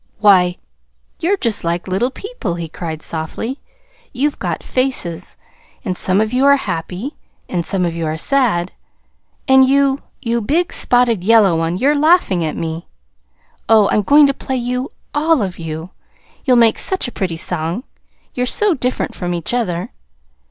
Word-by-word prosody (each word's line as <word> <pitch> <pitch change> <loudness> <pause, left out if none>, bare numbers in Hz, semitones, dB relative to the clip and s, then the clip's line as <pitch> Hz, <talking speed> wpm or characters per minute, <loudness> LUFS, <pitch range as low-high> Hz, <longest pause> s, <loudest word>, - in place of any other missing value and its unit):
"Why, 185 -4 +4 0.6
you're 370 +4 +1
just 230 - -1
like 170 +2 -2
little 195 +7 0
people," 270 - -5
he 170 -1 -5
cried 160 -1 -6
softly. 170 - -4 0.5
"You've 280 +3 -1
got - - -3
faces; 220 -10 -2 0.5
and 185 -3 -1
some 185 +2 0
of 220 +2 0
you 255 +2 +2
are 280 - +7
happy, 190 - -4 0.3
and 175 -2 -2
some 190 0 -1
of 170 - -2
you 165 -1 -3
are 155 +1 -2
sad. 210 - +1 0.8
And 265 -1 +7
you 275 0 +2 0.2
you 235 -2 -1
big 330 +11 0
spotted 240 -6 +2
yellow 210 -4 +5
one 165 +2 -1
you're 275 +8 +3
laughing 300 - +3
at 155 - -3
me. 165 0 -4 0.8
Oh, 220 -2 +5
I'm 210 - +3
going 290 +8 +6
to 275 - +2
play 265 -1 -4
you 250 +2 -3 0.2
all 305 -3 +2
of 185 -2 -5
you. 160 +2 -6 0.5
You'll 255 -3 +4
make 230 -2 +4
such 380 -8 0
a - - -6
pretty 180 -6 -3
song, 175 +5 -2 0.5
you're 250 0 -1
so 420 +7 +3
different 255 -3 -2
from 175 -1 -3
each 170 +6 -3
other!" 180 -8 -2
215 Hz, 165 wpm, -17 LUFS, 175-265 Hz, 0.8 s, are